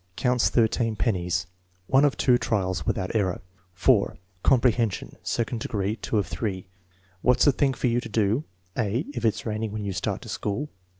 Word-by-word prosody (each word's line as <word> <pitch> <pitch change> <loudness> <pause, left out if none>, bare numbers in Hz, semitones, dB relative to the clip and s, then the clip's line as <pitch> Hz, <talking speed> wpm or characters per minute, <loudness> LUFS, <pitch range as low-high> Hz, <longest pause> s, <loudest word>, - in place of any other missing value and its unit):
Counts 125 -1 +2
13 115 -1 +2
pennies. 90 -5 0 0.4
(1 135 +8 +4
of 145 - +1
2 125 -2 +4
trials, 95 -7 -1
without 95 +3 -1
error*) 95 -5 +1 0.4
4. - - +3 0.2
Comprehension, 120 -5 +2
2d 115 0 -1
degree. 100 -2 -1
(8 110 +1 -6
of 105 -3 +3
3.) 95 0 -3 0.6
"What's 125 0 +4
the 145 - +7
thing 135 0 +1
for - - -3
you 120 0 +2
to - - -8
do": 110 +5 +1 0.3
(a) 115 +5 0
"If 120 -4 -4
it 110 - +3
is - - -8
raining 110 -1 -2
when 105 -1 -4
you 100 - -2
start - - -2
to - - -10
school?" 135 +9 -3
110 Hz, 180 wpm, -26 LUFS, 100-125 Hz, 0.6 s, the